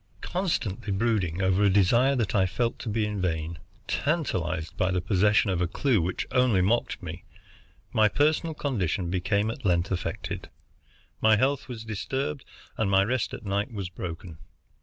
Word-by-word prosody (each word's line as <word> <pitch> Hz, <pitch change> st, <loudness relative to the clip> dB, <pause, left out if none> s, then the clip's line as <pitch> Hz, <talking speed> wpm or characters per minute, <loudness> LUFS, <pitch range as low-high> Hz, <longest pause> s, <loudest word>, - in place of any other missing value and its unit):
Constantly 140 Hz, -, -2 dB
brooding 95 Hz, -4 st, 0 dB
over 95 Hz, +1 st, +2 dB
a 100 Hz, -, +5 dB
desire 115 Hz, +8 st, +4 dB
that 115 Hz, -6 st, 0 dB
I 95 Hz, -2 st, +3 dB
felt 115 Hz, +5 st, -1 dB
to 115 Hz, -, -5 dB
be 110 Hz, 0 st, 0 dB
vain, 85 Hz, -4 st, -2 dB, 0.3 s
tantalized 90 Hz, -, -1 dB
by 95 Hz, -2 st, +1 dB
the 95 Hz, -1 st, +1 dB
possession 100 Hz, +3 st, +3 dB
of 90 Hz, -1 st, 0 dB
a 90 Hz, -, +2 dB
clue 120 Hz, +2 st, +1 dB
which 90 Hz, +3 st, -2 dB
only 125 Hz, -6 st, +3 dB
mocked 100 Hz, +3 st, +1 dB
me, 85 Hz, +1 st, -7 dB, 0.7 s
my 110 Hz, -1 st, +5 dB
physical 155 Hz, +5 st, +1 dB
condition 95 Hz, -, -1 dB
became 100 Hz, +4 st, +1 dB
at 130 Hz, -, -9 dB
length 90 Hz, -2 st, +1 dB
affected. 90 Hz, -3 st, -4 dB, 0.7 s
My 110 Hz, 0 st, +6 dB
health 135 Hz, +4 st, +1 dB
was 115 Hz, -4 st, -7 dB
disturbed 130 Hz, +6 st, -3 dB, 0.3 s
and 110 Hz, -3 st, +1 dB
my 95 Hz, 0 st, +5 dB
rest 125 Hz, +3 st, -1 dB
at -, -, -11 dB
night 100 Hz, +2 st, -1 dB
was 100 Hz, -5 st, -4 dB
broken. 85 Hz, -2 st, -7 dB
100 Hz, 160 wpm, -27 LUFS, 90-120 Hz, 0.7 s, My